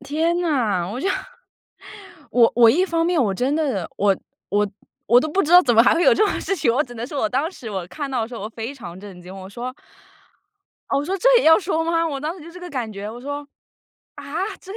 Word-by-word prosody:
天 320 +5 0
哪， 225 - 0
我 230 +6 -5
就 385 - 0 1.2
我 235 -2 +5
我 235 -2 +7
一 355 +10 +2
方 330 -2 0
面 340 -5 +2
我 205 - 0
真 260 +7 0
的， 265 - -1
我 200 -1 +2 0.3
我 205 0 +1 0.4
我 240 +2 +6
都 310 - -2
不 385 +6 +1
知 320 - -1
道 360 - +10
怎 240 -6 +2
么 230 - +7
还 - - +4
会 340 - +1
有 - - +6
这 430 - +3
种 - - -2
事 390 - -2
情。 235 - +2
我 270 - +2
只 245 -4 -11
能 235 +1 -5
说 285 0 -4
我 215 - +1
当 275 +8 -1
时 240 - -9
我 190 -4 -4
看 285 +7 -5
到 250 -3 -1
的 220 - -4
时 245 - -9
候 200 - -7
我 215 - -4
非 230 +4 -6
常 180 -8 -10
震 195 -3 -11
惊， 180 +2 -11
我 190 0 -9
说 245 +5 -6 1.2
哦， 275 - +2
我 285 - -2
说 380 +4 -2
这 - - +3
也 - - -1
要 320 +3 +7
说 325 -3 -1
吗？ 330 0 +1
我 280 -3 -4
当 315 +5 -3
时 325 - -12
就 335 - -10
这 360 +1 -12
个 360 - -7
感 240 -5 -3
觉， 205 +2 -6
我 240 - -9
说， 285 +2 -5 0.7
啊？ - - -10 0.4
这 385 - -11
265 Hz, 275 characters per minute, -22 LUFS, 220-325 Hz, 1.2 s, 道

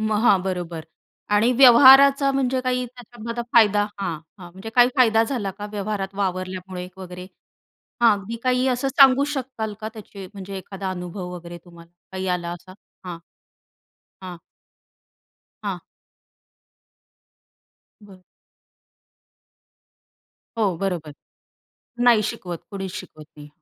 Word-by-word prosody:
मग 215 0 0
हां, 200 -5 +5
बरोबर 175 -4 -4 0.5
आणि 225 +4 +3
व्यवहाराचा 270 +2 +8
म्हणजे 260 -1 0
काही 250 0 -1
त्याच्यामध्ये 240 -1 -8
फायदा 210 -3 +5 0.2
हां, 175 -5 -3 0.2
हां. 175 -2 -11
म्हणजे 190 +5 -9
काही 245 0 +6
फायदा 225 -4 +4
झाला 225 -6 -3
का 205 - -5
व्यवहारात 200 -1 -4
वावरल्यामुळे 185 -1 -4
वगैरे 180 -1 -9 0.8
हां, 235 - +7
अगदी 200 +4 -7
काही 255 0 +1
असं 255 +1 0
सांगू 270 0 +5
शकाल 245 -5 -4
का 215 - -4
त्याचे 205 -3 -10
म्हणजे 195 -1 -7
एखादा 190 +1 -6
अनुभव 180 0 -6
वगैरे 175 0 -9
तुम्हाला 170 -1 -16 0.2
काही 190 0 -4
आला 175 -1 -2
असा? 175 +2 -10 0.3
हां. 175 -2 -6 1.1
हां. 180 -1 -7 1.3
हां. - - -4 2.2
बरं. 190 -3 -16 2.4
हो 195 -6 +1
बरोबर. 175 -6 -3 0.9
नाही 240 -3 +5
शिकवत. 175 -2 -7
कोणीच 195 -2 -5
शिकवत 155 -6 -10
नाही. 150 -1 -12
200 Hz, 115 wpm, -22 LUFS, 180-240 Hz, 2.4 s, व्यवहाराचा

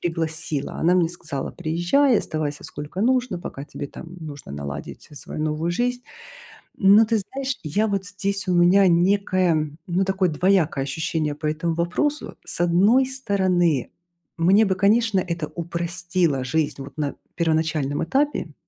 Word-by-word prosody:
пригласила. 160 -3 -3
Она 175 +3 +2
мне 175 -3 +3
сказала: 155 -5 -5
"Приезжай, 180 - +2
оставайся 150 -2 -3
сколько 160 +3 -6
нужно, 250 -4 +1
пока 140 -4 -7
тебе 145 - -7
там 165 +5 -11
нужно 145 - -9
наладить, 70 0 -7
э, - - -13
свою 145 - -7
новую 155 +2 -1
жизнь". 245 +6 -1 0.8
М, 195 0 +6
но 225 - +7
ты 225 0 +1
знаешь, 265 +6 -4
я, 205 +9 +1
вот, 195 -2 -2
здесь 200 0 -3
у 180 - +2
меня 180 +3 +5
некое, 175 -3 +2 0.2
ну, 180 +2 +1
такое 190 -1 +1
двоякое 165 -3 +2
ощущение 155 +2 -2
по 150 +1 -6
этому 165 +2 -1
вопросу. 180 - -1
С - - -3
одной 195 +9 +4
стороны, 185 - +1 0.5
мне 190 +6 +5
бы, 190 -2 +1
конечно, 210 +2 +3
это 170 -4 -3
упростило 170 -3 -1
жизнь 145 +2 -1
вот 140 +2 -11
на 145 -2 -2 0.2
первоначальном 155 -3 0
этапе. 265 - -1
175 Hz, 150 wpm, -23 LUFS, 155-200 Hz, 0.8 s, но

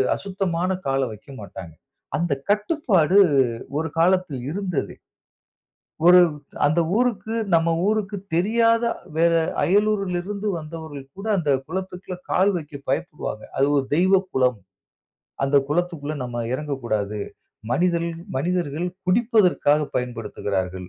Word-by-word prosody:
அசுத்தமான 185 -3 -2 0.2
கால 135 0 +1
வைக்கமாட்டாங்க. 100 - -10 0.4
அந்த 170 -2 0 0.2
கட்டுப்பாடு 205 - +2 0.6
ஒரு 160 +1 -1
காலத்தில் 175 -6 +2
இருந்தது. 180 -3 -3 1.1
ஒரு 180 +1 +9 0.5
அந்த 155 +4 +2 0.2
ஊருக்கு 230 -2 0 0.2
நம்ம 165 0 +3 0.2
ஊருக்கு 210 -1 0 0.2
தெரியாத 230 +6 +3 0.3
வேற 170 +1 +4 0.3
அயலூர்ல 200 -2 +2
இருந்து 205 +2 -4
வந்தவர்கள் 155 -3 -8
கூட 200 - -7
அந்த 155 -5 0 0.2
குளத்துக்குள்ள 185 +1 -5 0.2
கால் 190 +2 +4
வைக்க 150 -3 -7 0.2
பயப்படுவாங்க. 150 - -3
அது 135 - +3
ஒரு 140 - +2
தெய்வ 185 +3 +4
குளம். 125 -3 +2 0.9
அந்த 135 +1 +2
குளத்துக்குள்ள 155 -2 -1
நம்ம 120 -1 -5
இறங்கக்கூடாது. 120 -7 -2 0.5
மனிதல் 170 0 +1 0.3
மனிதர்கள் 170 +1 -1 0.2
குடிப்பதற்காக 185 - +3 0.2
பயன்படுத்துகிறார்கள். 100 -7 -3
170 Hz, 105 wpm, -23 LUFS, 140-195 Hz, 1.1 s, ஒரு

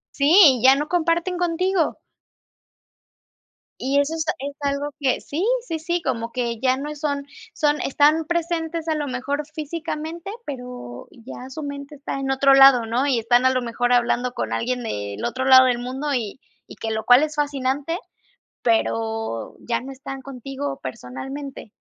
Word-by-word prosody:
Sí, 290 - +6
ya 265 +1 +8
no 295 +2 -2
comparten 345 +1 0
contigo. 355 0 0 1.8
Y 270 +2 +1
eso 285 +3 -2
esta 320 -1 -1
es 280 +1 -5
algo 285 +1 -2
que 265 -3 +1
sí, 325 +7 -3 0.2
sí, 325 -6 -3
sí, 345 +2 -1
como 230 -5 -2
que 235 -3 -2
ya 255 -1 +3
no 290 +3 -5
son 285 -1 -2 0.3
son 300 -3 +1
están 300 +3 +3
presentes 335 -1 -2
a 315 - +1
lo 295 -1 -2
mejor 280 +3 -2
físicamente, 320 +2 -5 0.2
pero 250 - -8
ya 250 +2 -10
su 310 +4 -7
mente 285 +1 -7
está 275 -1 -5
en 270 0 -3
otro 270 +1 +4
lado, 270 -3 +7
¿no?, 240 +5 0
y 260 -4 +2
están 240 +3 +3
a 260 - +5
lo 255 -1 0
mejor 245 +1 0
hablando 245 +1 +1
con - - -3
alguien 250 +1 -1
del 100 - -4
otro 255 +2 -2
lado 260 -1 +8
del 245 -1 +1
mundo, 265 +4 -3
y 235 -2 -3 0.3
y - - -11
que 225 - -4
lo 220 0 -3
cual 245 +3 +7
es 305 -1 -2
fascinante, 285 +2 -1 0.6
pero 225 - -1
ya 235 -1 -1
no 270 - -8
están 270 0 -8
contigo 270 - -6
personalmente. 230 - -7
275 Hz, 170 wpm, -23 LUFS, 245-300 Hz, 1.8 s, ya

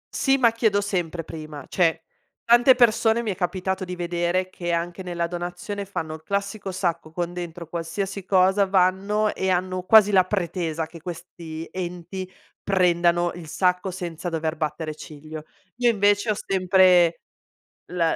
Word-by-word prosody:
Sì, 270 -1 +3
ma 240 -3 +4
chiedo 220 -3 +1
sempre 175 -4 -2
prima, 155 -2 -9
cioè 165 -2 +1 0.4
tante 240 +2 +6
persone 235 -1 +3
mi 215 - -1
è - - -4
capitato 190 +1 -2
di 180 0 -5
vedere 175 +1 -1
che 175 -2 -4
anche 170 +2 -2
nella 175 -2 -2
donazione 175 +4 -5
fanno 160 -5 -5
il 160 - -9
classico 200 +2 -3
sacco 170 -3 -2
con 175 +1 -3
dentro 175 -1 -6
qualsiasi 185 +4 -4
cosa, 190 +1 +3
vanno 195 +3 +2
e 190 - -2
hanno 185 0 0
quasi 210 +2 +6
la 185 -2 +5
pretesa 170 -4 -2
che 165 0 -13
questi 165 -1 -8
enti 185 +1 -6 0.3
prendano 175 -2 +2
il 170 -3 -10
sacco 180 +3 0
senza 175 -1 -5
dover 160 -1 -2
battere 155 0 -3
ciglio. 155 0 -10 0.3
Io 245 -1 +3
invece 205 0 +2
ho 210 - +2
sempre 185 -3 +4 0.7
l 180 - -3
180 Hz, 150 wpm, -24 LUFS, 170-195 Hz, 0.7 s, tante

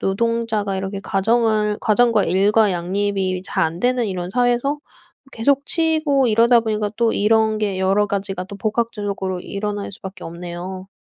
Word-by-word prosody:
노동자가 220 -1 0
이렇게 195 +1 -4
가정을 215 +1 +1
가정과 225 -1 +3
일과 200 +3 +3
양립이 185 +1 -1
잘 - - 0
안되는 240 +9 0
이런 180 -2 -4
사회에서 245 +5 +1 0.5
계속 280 +5 +1
치이고 310 -5 +1
이러다 230 +2 +5
보니까 215 -2 -1
또 230 -1 +2
이런 220 +1 +2
게 200 -3 -1
여러 195 +2 +2
가지가 195 -2 -3
또 200 +2 -9
복합적으로 205 -3 -2
일어날 205 +1 -4
수밖에 190 -1 -9
없네요. 175 +2 -7
210 Hz, 345 characters per minute, -20 LUFS, 190-230 Hz, 0.5 s, 이러다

